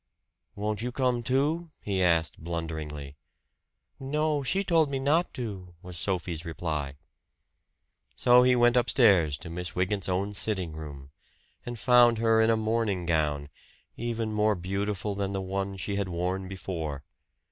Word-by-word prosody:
"Won't 105 Hz, +1 st, -2 dB
you 125 Hz, +1 st, -2 dB
come, 125 Hz, -1 st, 0 dB
too?" 145 Hz, +8 st, 0 dB
he 95 Hz, -2 st, -1 dB
asked 85 Hz, -3 st, +2 dB
blunderingly. 80 Hz, -4 st, -5 dB, 0.8 s
"No, 150 Hz, +2 st, 0 dB
she 190 Hz, +9 st, +1 dB
told 165 Hz, -5 st, +3 dB
me 140 Hz, -, -1 dB
not 150 Hz, +6 st, +2 dB
to," 95 Hz, -7 st, -6 dB
was 90 Hz, -1 st, -8 dB
Sophie's 85 Hz, -3 st, -2 dB
reply. 75 Hz, -4 st, -3 dB, 1.2 s
So 125 Hz, 0 st, +6 dB
he 125 Hz, 0 st, +5 dB
went 120 Hz, 0 st, +4 dB
upstairs 100 Hz, -, +4 dB
to 80 Hz, +2 st, -9 dB
Miss 90 Hz, 0 st, -5 dB
Wygant's 95 Hz, +1 st, 0 dB
own 95 Hz, +3 st, -1 dB
sitting 95 Hz, -5 st, -1 dB
room, 70 Hz, -3 st, -9 dB, 0.6 s
and 120 Hz, -1 st, -4 dB
found 120 Hz, 0 st, +5 dB
her 115 Hz, 0 st, +3 dB
in 110 Hz, -, +4 dB
a 115 Hz, -, +3 dB
morning 110 Hz, -4 st, 0 dB
gown, 75 Hz, -3 st, 0 dB, 0.5 s
even 115 Hz, -2 st, -3 dB
more 105 Hz, 0 st, +2 dB
beautiful 100 Hz, +3 st, -2 dB
than 100 Hz, 0 st, -2 dB
the 95 Hz, -, -1 dB
one 95 Hz, +1 st, -3 dB
she 100 Hz, +2 st, -3 dB
had 100 Hz, -2 st, -1 dB
worn 90 Hz, +2 st, -2 dB
before. 80 Hz, -7 st, -5 dB
100 Hz, 145 wpm, -28 LUFS, 85-120 Hz, 1.2 s, So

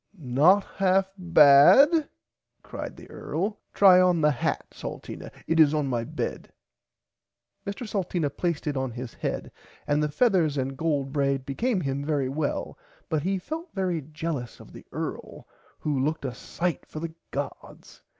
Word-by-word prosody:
Not 155 Hz, +8 st, +4 dB
half 190 Hz, 0 st, +2 dB
bad 180 Hz, -, +6 dB, 0.5 s
cried -, -, -7 dB
the -, -, -12 dB
earl 200 Hz, +6 st, -3 dB
try 185 Hz, -2 st, +7 dB
on 180 Hz, -2 st, +3 dB
the 150 Hz, 0 st, +4 dB
hat 125 Hz, -, -2 dB
Salteena -, -, -8 dB, 0.2 s
it 165 Hz, +1 st, +1 dB
is 155 Hz, -1 st, +6 dB
on 150 Hz, -2 st, 0 dB
my 120 Hz, -4 st, -1 dB
bed. -, -, -5 dB, 1.2 s
Mr 200 Hz, +4 st, -5 dB
Salteena 175 Hz, -7 st, -1 dB
placed 170 Hz, 0 st, -2 dB
it 150 Hz, -2 st, -1 dB
on 130 Hz, -1 st, -1 dB
his 120 Hz, 0 st, -7 dB
head -, -, -4 dB, 0.3 s
and 145 Hz, +1 st, +1 dB
the 150 Hz, -, 0 dB
feathers 170 Hz, -, +2 dB
and 135 Hz, 0 st, -2 dB
gold 140 Hz, -3 st, -1 dB
braid 140 Hz, -2 st, 0 dB
became 195 Hz, -, -1 dB
him 140 Hz, -1 st, -2 dB
very 145 Hz, -3 st, 0 dB
well 145 Hz, +1 st, -3 dB, 0.3 s
but 155 Hz, -2 st, 0 dB
he 190 Hz, +5 st, 0 dB
felt 315 Hz, -, -6 dB
very 180 Hz, -4 st, -1 dB
jellous 150 Hz, -3 st, -5 dB
of -, -, -14 dB
the -, -, -13 dB
earl -, -, -6 dB, 0.3 s
who 145 Hz, -3 st, -1 dB
looked 155 Hz, 0 st, -2 dB
a 130 Hz, -, -3 dB
sight 170 Hz, +7 st, -3 dB
for 155 Hz, -, -7 dB
the 165 Hz, 0 st, -5 dB, 0.2 s
gods. -, -, -7 dB
155 Hz, 160 wpm, -26 LUFS, 140-185 Hz, 1.2 s, try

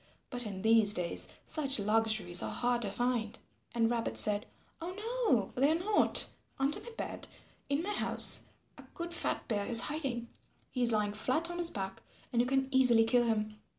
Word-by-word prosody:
But 245 Hz, -2 st, -3 dB
in 190 Hz, -2 st, -7 dB
these 220 Hz, -2 st, +4 dB
days 175 Hz, -1 st, -1 dB, 0.2 s
such 280 Hz, -4 st, +2 dB
luxuries 215 Hz, -4 st, +2 dB
are -, -, -3 dB
hard 245 Hz, 0 st, -1 dB
to 205 Hz, -4 st, -4 dB
find." 240 Hz, -1 st, -2 dB, 0.4 s
And 230 Hz, -1 st, +2 dB
Rabbit 235 Hz, 0 st, -2 dB
said, 210 Hz, 0 st, +3 dB, 0.3 s
"Oh 355 Hz, +2 st, -6 dB
no, 440 Hz, -, -1 dB
they 275 Hz, +3 st, +2 dB
are -, -, +2 dB
not; 410 Hz, +4 st, +4 dB, 0.3 s
under 275 Hz, +2 st, +1 dB
my -, -, -11 dB
bed -, -, -6 dB, 0.4 s
in 285 Hz, +3 st, -1 dB
my 415 Hz, +3 st, -3 dB
house, -, -, +2 dB, 0.3 s
a -, -, -12 dB
good 340 Hz, 0 st, -5 dB
fat -, -, -2 dB
bear 205 Hz, -4 st, -2 dB
is 230 Hz, -1 st, +6 dB
hiding. 270 Hz, -6 st, -4 dB, 0.4 s
He 250 Hz, -, -3 dB
is 240 Hz, -1 st, +3 dB
lying 210 Hz, -2 st, 0 dB
flat 285 Hz, +10 st, -2 dB
on 345 Hz, -, -6 dB
his 345 Hz, -1 st, -2 dB
back, 195 Hz, -6 st, -6 dB, 0.3 s
and 235 Hz, -, +3 dB
you 245 Hz, -, -1 dB
can 270 Hz, 0 st, 0 dB
easily 250 Hz, -4 st, +5 dB
kill 240 Hz, +2 st, +2 dB
him." 215 Hz, -2 st, -2 dB
240 Hz, 185 wpm, -31 LUFS, 215-280 Hz, 0.4 s, is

